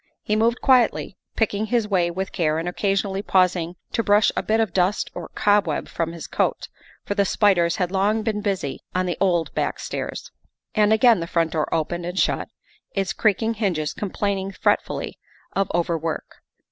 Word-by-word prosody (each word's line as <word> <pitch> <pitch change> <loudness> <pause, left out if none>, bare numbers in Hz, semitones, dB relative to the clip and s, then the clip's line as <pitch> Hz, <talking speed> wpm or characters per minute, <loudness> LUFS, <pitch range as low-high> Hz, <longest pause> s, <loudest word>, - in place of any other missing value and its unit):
He 210 - 0
moved 230 +2 +2
quietly, 250 -6 +3 0.2
picking 215 -1 0
his 230 -1 +1
way 180 -4 +2
with 190 +3 -4
care 155 -4 0
and 165 +2 -3
occasionally 195 +1 0
pausing 180 -3 +1 0.2
to - - +1
brush 205 -1 +4
a - - 0
bit 220 +1 +1
of 220 -6 0
dust 190 +3 +1
or - - -7
cobweb 205 -7 +2
from 165 -1 -2
his 170 -1 -8
coat, - - -1 0.4
for - - -1
the 200 -1 +2
spiders 185 -4 +3
had 180 -4 -1
long 205 +3 +1
been 215 -2 -1
busy 195 -9 -2 0.2
on 185 0 +1
the 175 - -1
old 175 -4 +1
back - - -1
stairs. - - -5 0.4
And 210 -1 +3
again 225 -1 +5
the 165 - -4
front 165 -2 +1
door 155 -2 -1
opened 170 +2 -1
and 180 +1 -5
shut, - - +1 0.5
its 195 -1 0
creak 215 0 +1
ing 225 +1 +1
hinges 180 -9 -1
complaining 195 -1 -2
fretfully - - -1 0.4
of 195 -1 +1
overwork. 165 -2 -2
195 Hz, 180 wpm, -23 LUFS, 175-210 Hz, 0.5 s, again